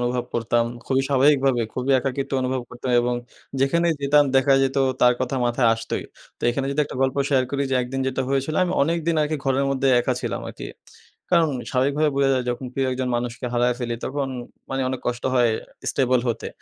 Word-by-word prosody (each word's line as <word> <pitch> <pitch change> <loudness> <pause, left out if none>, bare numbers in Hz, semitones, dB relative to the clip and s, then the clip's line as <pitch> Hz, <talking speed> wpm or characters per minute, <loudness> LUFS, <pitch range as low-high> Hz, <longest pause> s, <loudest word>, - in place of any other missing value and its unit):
অনুভব 120 0 -1
করতাম। 115 0 +1 0.2
খুবই 135 0 +2
স্বাভাবিকভাবে, 135 -2 +3
খুবই 130 +2 0
একাকিত্ব 135 +1 -3
অনুভব 130 0 -1
করতাম 125 +1 -5
এবং 120 0 0 0.5
যেখানেই 170 +5 +2
যেতাম 145 +1 +4
দেখা 135 +1 +4
যেত 135 0 0 0.2
তার 125 0 +5
কথা 130 +1 -1
মাথায় 120 0 +2
আসতই। 115 0 -4 0.3
তো - - -23
এখানে 135 +2 -2
যদি 140 - 0
একটা - - -8
গল্প 130 0 0
শেয়ার 130 -3 +3
করি 140 0 -1
যে, - - +1
একদিন 130 +2 -4
যেটা 130 0 -1
হয়েছিল 135 +3 -1
আমি 180 - -2
অনেক 165 +4 +1
দিন 170 - +2
আরকি 155 +1 -1
ঘরের 135 0 +1
মধ্যে 135 0 +1
একা - - 0
ছিলাম - - -3
আরকি। - - -8 0.7
কারণ 170 -2 +5 0.2
স্বাভাবিকভাবে 140 +4 +1
বোঝা 140 -1 +3
যায় 130 -1 -1
যখন 125 +2 -4
প্রিয় 135 +1 0
একজন 130 0 -2
মানুষকে 120 +1 -4
হারায় 120 0 +2
ফেলি 120 -2 -3
তখন 140 0 -2 0.4
মানি 135 0 -1
অনেক 130 -1 -3
কষ্ট 120 0 -2
হয় 120 -2 +4 0.4
স্টেবল 130 -2 +2
হতে। 115 - -2
130 Hz, 195 wpm, -23 LUFS, 125-140 Hz, 0.7 s, তার